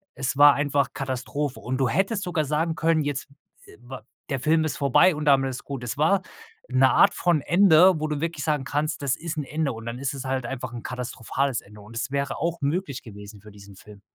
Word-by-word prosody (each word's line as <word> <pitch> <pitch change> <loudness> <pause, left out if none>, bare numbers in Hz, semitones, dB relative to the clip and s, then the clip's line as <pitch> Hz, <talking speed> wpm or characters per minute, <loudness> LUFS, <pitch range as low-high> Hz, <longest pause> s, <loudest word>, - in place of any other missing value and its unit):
es 135 0 -2
war 145 0 +8
einfach 145 -1 0
Katastrophe 135 +1 -3
und 130 +1 -3
du 130 -1 +1
hättest 195 - 0
sogar 170 -5 -1
sagen 160 +3 0
können: 160 -1 +1
„Jetzt, 145 -1 -3 0.4
äh, - - -16
wa 130 +1 -9 0.3
der 135 - -1
Film 155 +4 +2
ist 155 - -3
vorbei 140 +6 +4
und 150 0 -5
damit 135 -2 +3
ist 125 - -7
gut." 135 -3 -6
Es 125 +4 -5
war 185 +5 +3 0.4
'ne 130 +1 +4
Art 200 +10 +5
von 175 -6 +1
Ende, 175 0 +5
wo 155 - -2
du 150 -1 -3
wirklich 165 -3 -3
sagen 150 -3 0
kannst: 145 +2 -2
„Das 140 -2 +1
ist 165 -1 -6
'n 150 - -1
Ende.“ 150 0 -2
und 115 +1 -9
dann 120 +2 -5
ist 140 0 -3
es 135 - -6
halt 130 -2 -2
einfach 130 -1 -6
'n 120 - -6
katastrophales 125 +1 -3
Ende 105 +1 -16
und 110 +3 -14
es 130 +3 -3
wäre 140 0 -2
auch 170 0 -2
möglich 145 -2 -2
gewesen 105 -1 -11
für 105 +1 -14
diesen 100 -1 -14
Film. 100 +1 -15
140 Hz, 230 wpm, -25 LUFS, 125-155 Hz, 0.4 s, war